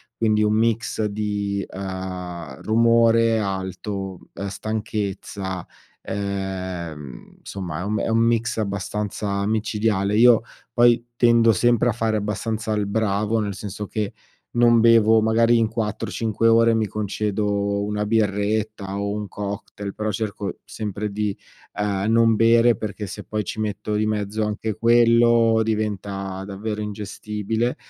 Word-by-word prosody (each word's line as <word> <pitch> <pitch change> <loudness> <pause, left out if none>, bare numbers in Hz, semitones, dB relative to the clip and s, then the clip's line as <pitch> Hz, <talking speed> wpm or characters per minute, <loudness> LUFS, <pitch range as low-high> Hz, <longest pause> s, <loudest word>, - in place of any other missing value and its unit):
quindi 110 -1 +2
un 105 0 +2
mix 115 0 +1
di, 100 -1 -2
uhm, 90 -6 -6
rumore 115 0 +4
alto, 95 -1 -4
uhm, 100 - -5
stanchezza, 100 -3 -4 0.4
ehm, 95 -8 -5
insomma 90 -5 -5
è - - -3
un 105 +2 -1
è - - -1
un 115 0 +2
mix 115 0 +1
abbastanza 100 -1 -2
micidiale. 105 -2 0
Io 120 +1 +6 0.3
poi 120 0 +4
tendo 115 -1 +5
sempre 120 +3 +3
a - - +3
fare 115 -1 -1
abbastanza 110 +2 -2
il 105 -1 0
bravo, 105 +1 0
nel 105 -2 -2
senso 100 +1 -6
che 105 -1 -3 0.4
non 120 -1 +4
bevo, 115 -1 +5
magari 115 +2 +4
in 115 -1 +3
4-5 110 0 -1
ore 115 0 +5
mi 110 -1 +1
concedo 100 0 -1
una 105 0 -2
birretta 105 -1 0
o 100 0 -2
un 105 0 -4
cocktail, 100 0 -6
però 110 0 -3
cerco 105 -1 -4
sempre 105 -1 -4
di, 105 -1 -2 0.4
uhm, 100 -2 -1
non 115 0 +4
bere, 115 +1 +5
perché 105 0 -5
se 95 - -7
poi 105 -1 -2
ci 105 - -6
metto 105 0 -3
di 105 +1 +1
mezzo 105 0 -1
anche 105 +1 -2
quello 115 0 +4
diventa 100 -3 -3
davvero 105 +2 -4
ingestibile. 105 +2 -3
105 Hz, 135 wpm, -23 LUFS, 100-115 Hz, 0.4 s, Io